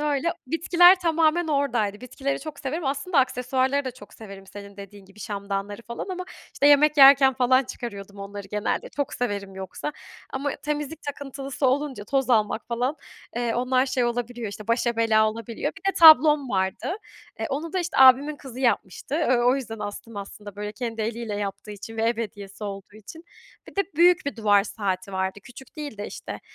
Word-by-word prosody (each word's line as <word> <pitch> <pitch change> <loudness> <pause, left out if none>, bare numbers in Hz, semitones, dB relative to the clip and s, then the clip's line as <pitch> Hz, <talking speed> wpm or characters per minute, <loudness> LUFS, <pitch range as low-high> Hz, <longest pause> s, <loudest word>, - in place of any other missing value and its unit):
öyle. 295 +2 0
Bitkiler 350 +5 +5
tamamen 330 0 +2
oradaydı. 240 -8 0
Bitkileri 270 +3 -3
çok 300 -1 -8
severim. 300 +4 -4
Aslında 280 +5 0
aksesuarları 260 +2 +1
da 260 - -3
çok 255 - -15
severim 195 -3 -11
senin 200 +1 -11
dediğin 200 0 -11
gibi 195 +2 -17
şamdanları 200 +1 -4
falan 235 +8 -6
ama 365 -1 -4 0.3
işte, 285 - +2
yemek 295 +1 +5
yerken 270 -1 +8
falan 255 +1 +3
çıkarıyordum 200 -5 -8
onları 200 0 -8
genelde. 210 +1 -2
Çok 285 -2 -3
severim 200 -5 -3
yoksa 190 +10 -6 0.4
ama 280 +2 -2
temizlik 300 +1 -4
takıntılısı 275 -1 -4
olunca 265 -4 -1
toz 270 +2 0
almak 220 -1 +1
falan, 245 +5 -1 0.4
eee, 240 -1 -1
onlar 255 +2 +1
şey 255 -2 0
olabiliyor, 240 -1 -3
işte, 210 +1 -9
başa 235 0 +1
bela 220 -1 +3
olabiliyor. 230 +1 -5
Bir 390 0 0
de 385 - -15
tablom 300 -3 +8
vardı. 190 - -1 0.4
E, - - -3
onu 310 +4 -4
da, 375 - 0
işte, 350 0 -4
abimin 270 +3 +6
kızı 265 -3 -10
yapmıştı. 240 0 -1
E, 310 -5 +2
o 245 +2 +3
yüzden 225 -5 -6
astım 210 +1 -7
aslında, 200 0 -9
böyle, 210 0 -5
kendi 225 0 -4
eliyle 225 -1 -3
yaptığı 205 +1 -5
için 210 +2 -9
ve 225 - -1
ev 230 0 +1
hediyesi 205 -2 -6
olduğu 200 0 -7
için. 320 - -12 0.4
Bir - - -15
de 395 - +2
büyük 345 -2 +5
bir 285 - -3
duvar 205 -3 +3
saati 195 -2 -3
vardı. 190 +1 -2
Küçük 265 +4 -14
değil 290 -6 -6
de, 205 - -4
işte, - - -8
245 Hz, 180 wpm, -25 LUFS, 205-285 Hz, 0.4 s, yerken